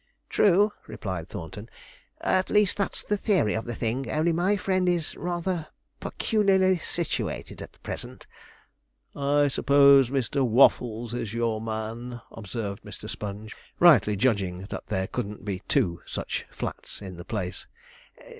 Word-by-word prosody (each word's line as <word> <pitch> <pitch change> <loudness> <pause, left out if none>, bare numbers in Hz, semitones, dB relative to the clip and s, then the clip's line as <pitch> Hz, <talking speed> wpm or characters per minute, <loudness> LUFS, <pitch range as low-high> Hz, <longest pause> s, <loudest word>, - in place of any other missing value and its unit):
'True,' 205 +1 +4
replied 95 -6 -5
Thornton; 105 +4 -8 0.5
'at 185 0 +1
least 210 -2 +4
that's 200 - -2
the 210 - 0
theory 190 - +2
of 110 - -2
the 120 -1 -4
thing; 120 +3 -2
only 155 +9 +2
my 180 +5 +2
friend 185 -1 +1
is 170 -3 -1
rather 175 -1 -2 0.3
peculiarly 190 -4 +2
situated 170 0 -3
at - - -10
present.' - - -6 0.9
'I 145 +1 +3
suppose 140 -1 +6
Mr. 135 +1 0
Waffles 120 -1 +3
is 115 -2 -4
your 115 -2 0
man?' 115 +2 -4
observed 105 -2 -5
Mr. - - -9
Sponge, 105 +1 -6 0.2
rightly 130 - +6
judging 100 -5 0
that - - -6
there 95 0 -1
couldn't 100 +1 -5
be 95 -3 -3
two 85 -1 +1
such - - -4
flats - - -6
in 95 -3 -8
the 85 - -8
place. 95 -4 -4
120 Hz, 135 wpm, -27 LUFS, 105-175 Hz, 0.9 s, suppose